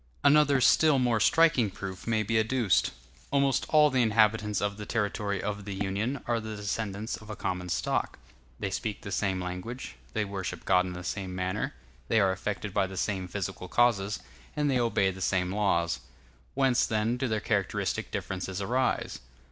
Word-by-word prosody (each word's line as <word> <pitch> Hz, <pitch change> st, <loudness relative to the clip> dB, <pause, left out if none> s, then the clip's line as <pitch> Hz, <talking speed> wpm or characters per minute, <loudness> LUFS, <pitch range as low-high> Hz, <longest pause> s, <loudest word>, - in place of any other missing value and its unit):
Another 145 Hz, -1 st, +5 dB
still 150 Hz, +3 st, +5 dB
more 120 Hz, -3 st, +2 dB
striking 145 Hz, -1 st, +4 dB
proof 95 Hz, 0 st, -7 dB
may 110 Hz, -1 st, +2 dB
be 110 Hz, +2 st, +1 dB
adduced. 110 Hz, -5 st, +2 dB, 0.4 s
Almost 140 Hz, -1 st, +2 dB
all 150 Hz, -1 st, +5 dB
the 130 Hz, -1 st, +3 dB
inhabitants 110 Hz, -2 st, +3 dB
of 100 Hz, 0 st, -1 dB
the 105 Hz, -, -6 dB
territory 105 Hz, -2 st, -1 dB
of 105 Hz, -1 st, -3 dB
the 100 Hz, -2 st, -4 dB
Union 100 Hz, +7 st, -2 dB
are 120 Hz, -1 st, +1 dB
the 110 Hz, -1 st, -6 dB
descendants 105 Hz, +1 st, -3 dB
of 110 Hz, -, -14 dB
a 110 Hz, -, -4 dB
common 90 Hz, -2 st, -3 dB
stock; -, -, -1 dB, 0.4 s
they 100 Hz, -, -2 dB
speak 105 Hz, +2 st, -3 dB
the 100 Hz, -, -6 dB
same 95 Hz, -1 st, 0 dB
language, 90 Hz, +8 st, -6 dB, 0.2 s
they 105 Hz, -1 st, 0 dB
worship 100 Hz, -2 st, -5 dB
God 90 Hz, -1 st, +3 dB
in 90 Hz, -, -5 dB
the 90 Hz, 0 st, -7 dB
same 95 Hz, 0 st, -4 dB
manner, 90 Hz, -5 st, -2 dB, 0.3 s
they 115 Hz, -, +3 dB
are 95 Hz, -2 st, +4 dB
affected 100 Hz, +1 st, -4 dB
by 95 Hz, -, +2 dB
the 95 Hz, 0 st, -8 dB
same 95 Hz, -1 st, -1 dB
physical 95 Hz, -1 st, -4 dB
causes, 105 Hz, -2 st, +2 dB, 0.4 s
and 150 Hz, -2 st, +1 dB
they 130 Hz, -, +2 dB
obey 115 Hz, -5 st, +2 dB
the 95 Hz, 0 st, -10 dB
same 90 Hz, -1 st, +1 dB
laws. 85 Hz, -5 st, +1 dB, 0.6 s
Whence, 130 Hz, -2 st, +3 dB
then, 110 Hz, +1 st, +1 dB
do 130 Hz, +1 st, -1 dB
their 110 Hz, -2 st, 0 dB
characteristic 100 Hz, -3 st, -1 dB
differences 95 Hz, 0 st, -4 dB
arise? 125 Hz, +6 st, 0 dB
105 Hz, 180 wpm, -29 LUFS, 95-115 Hz, 0.6 s, Another